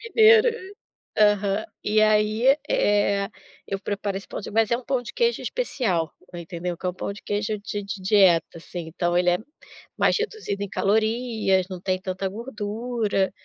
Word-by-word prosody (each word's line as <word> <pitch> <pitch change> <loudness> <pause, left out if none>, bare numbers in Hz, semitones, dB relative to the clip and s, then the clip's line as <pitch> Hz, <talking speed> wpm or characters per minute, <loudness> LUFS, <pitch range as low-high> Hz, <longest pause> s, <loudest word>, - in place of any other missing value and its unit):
Mineiro. 450 +1 +7 0.7
Aham. 205 0 +3 0.2
E 215 +1 +3
aí, 215 +5 +4
eh, 200 -1 +2 0.4
eu 195 - -2
preparo 200 0 -3
esse 195 - -7
pão - - -6
de - - -7
mas 225 +1 +2
é 235 - +4
um 250 - -9
pão 265 -2 0
de 245 - -8
queijo 475 -1 +1
especial, 220 - -1 0.2
entendeu? 170 0 -5
Que 185 - -6
é - - +2
um 180 - -3
pão 200 - -4
de 200 - -12
queijo 205 +1 -1
de 205 0 -5
de 200 0 -5
dieta, 185 -4 +4
assim, 170 0 -7
então 175 +1 -1
ele 180 0 +4
é 175 - +2 0.6
mais - - +3
reduzido 425 - -3
em 200 - -3
calorias, 220 -2 +1
não 185 -2 -6
tem 185 0 -1
tanta 190 0 -3
gordura. 215 -2 -2
205 Hz, 175 wpm, -24 LUFS, 190-225 Hz, 0.7 s, Mineiro